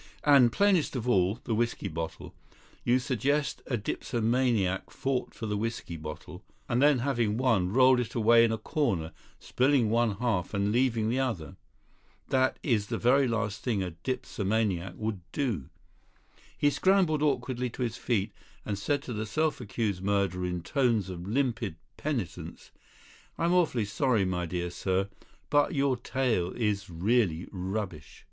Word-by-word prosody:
And, 140 -5 +6
plainest 190 - +2
of 125 -1 -3
all, 95 -4 +3
the 115 - -2
whisky 115 +2 -1
bottle. 80 +1 -6 0.5
You 120 +1 +3
suggest 140 +3 0
a 125 - 0
dipsomaniac 115 -3 0
fought 135 -2 -2
for 115 - -5
the 105 -1 -1
whisky 115 -5 -4
bottle, 75 -1 -8 0.2
and 120 +2 +1
then 145 -1 +5
having 115 -6 +1
won, 115 -8 +2
rolled 130 +2 +5
it 120 -2 -4
away 115 0 +6
in 115 - +3
a 115 - 0
corner, 100 - -1 0.3
spilling 130 -4 +2
one 115 -2 +2
half 110 -5 -1
and 100 +1 +1
leaving 115 -2 +2
the 125 +3 0
other. 115 - -2 0.7
That 130 -1 +2
is 110 -7 +1
the - - -2
very 130 +3 +4
last 115 -3 -2
thing 110 -6 0
a 90 - -4
dipsomaniac 100 -2 -2
would 110 -3 -3
do." 115 - -2 0.9
He 145 - +3
scrambled 175 -1 +3
awkwardly 130 -4 0
to 125 - -4
his 115 -2 -2
feet, 110 -3 -1 0.3
and 100 -2 -3
said 140 +7 0
to 125 - -5
the 110 0 -3
self 155 +5 0
accused 105 -4 -2
murderer 95 -2 0
in 90 -1 -3
tones 115 - +1
of 90 0 -7
limpid 115 - -1 0.2
penitence: 130 - -4 0.7
"I'm 170 +1 +1
awfully 155 -11 +2
sorry, 110 0 +1
my 90 -2 -1
dear 90 0 -3
sir, 95 +2 -1 0.4
but 145 +3 +3
your 140 -2 +2
tale 120 -7 -1
is 105 -5 -1
really 90 -1 +1
rubbish." 95 -4 -5
115 Hz, 155 wpm, -29 LUFS, 95-130 Hz, 0.9 s, And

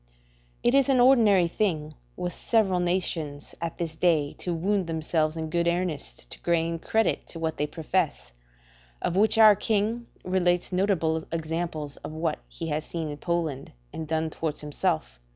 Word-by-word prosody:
It 240 - +4
is 275 -1 +4
an 260 -2 +4
ordinary 225 -8 +6
thing 160 -5 -1 0.2
with 180 -1 -3
several 200 -6 +1
nations 170 -5 -2
at 170 -1 -3
this 165 -2 -3
day 160 -4 +2
to 180 - -3
wound 185 +2 0
themselves 160 -1 0
in 160 -1 -4
good 170 0 +1
earnest 160 - -2
to - - -8
gain 165 -1 0
credit 220 +6 0
to - - -7
what 160 -1 -2
they 150 - 0
profess; 160 - -2 0.7
of 175 - -1
which 215 +3 +4
our 215 -2 +8
king, 220 +3 0 0.2
relates 180 -1 +1
notable 180 -4 +1
examples 160 -2 -3
of - - -8
what 160 -1 -1
he 165 -1 -6
has 150 +1 -1
seen 160 -2 -4
in 145 - -6
Poland 160 -4 -2 0.2
and 160 - -5
done 160 0 -1
towards 155 -1 -3
himself. - - -2
170 Hz, 165 wpm, -27 LUFS, 155-185 Hz, 0.7 s, our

